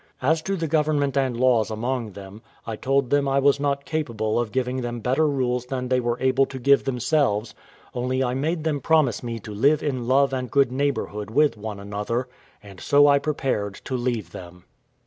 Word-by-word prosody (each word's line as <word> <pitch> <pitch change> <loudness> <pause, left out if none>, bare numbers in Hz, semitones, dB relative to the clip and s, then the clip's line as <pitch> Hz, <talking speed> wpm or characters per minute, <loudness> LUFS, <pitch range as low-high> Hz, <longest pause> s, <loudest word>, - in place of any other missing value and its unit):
As 160 +4 +2
to 195 +4 -2
the 165 -3 -2
government 150 -3 +1
and 130 -3 0
laws 120 -4 +3
among 115 0 -3
them, 100 +2 -11 0.2
I 115 - -4
told 135 +2 0
them 145 -1 +2
I 135 0 +1
was 140 0 +3
not 140 0 -1
capable 115 -9 -1
of 120 -3 -2
giving 130 +1 -1
them 120 -1 -4
better 130 +7 +1
rules 125 -3 -1
than 125 -1 -3
they 130 0 +2
were 120 -1 -1
able 130 +1 +2
to 135 - -8
give 140 +2 +3
themselves; 125 -4 0 0.4
only 130 +2 -1
I 125 -1 -1
made 155 +5 -1
them 150 -3 -1
promise 155 -8 +2
me 115 -1 -4
to 105 - -8
live 140 +8 +2
in 130 -5 -2
love 135 +1 +3
and 130 -1 -3
good 135 +1 +3
neighbourhood 125 -6 -2
with 145 +4 +3
one 105 -1 -6
another; 105 +5 -3 0.4
and 100 -3 -13
so 145 0 +5
I 140 -1 +5
prepared 135 -9 -2
to 130 - -3
leave 120 -8 -2
them. 90 0 -11
130 Hz, 200 wpm, -24 LUFS, 115-140 Hz, 0.4 s, so